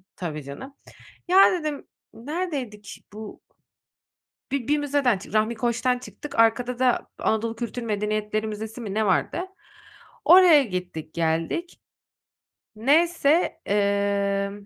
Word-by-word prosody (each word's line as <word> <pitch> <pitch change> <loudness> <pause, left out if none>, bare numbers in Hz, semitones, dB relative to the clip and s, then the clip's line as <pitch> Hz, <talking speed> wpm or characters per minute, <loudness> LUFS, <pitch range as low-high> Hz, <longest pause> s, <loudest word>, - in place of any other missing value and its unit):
Tabii 155 -5 -5
canım. 205 - -9 0.5
Ya 380 +2 +6
dedim, 305 -5 -3 0.3
neredeydik? 260 - -5
Bu 215 0 -9 1.1
bir 275 -3 -2
bir 295 +1 +2
müzeden 285 -6 +1
çıktık, 195 - -12
Rahmi 220 +2 +2
Koç'tan 240 +2 0
çıktık, 260 +1 -8
arkada 240 +2 +2
da 255 -1 +1
Anadolu 225 +1 0
Kültür 240 +1 -5
Medeniyetleri 215 0 -2
Müzesi 220 +3 -6
mi 200 -3 -5
ne 220 0 +1
vardı. 190 - +1 0.9
Oraya 350 -6 +8
gittik 180 -6 -6
geldik. 165 - -2 1.0
Neyse, 315 +6 +2
emm, 200 0 0
225 Hz, 110 wpm, -24 LUFS, 200-280 Hz, 1.1 s, Oraya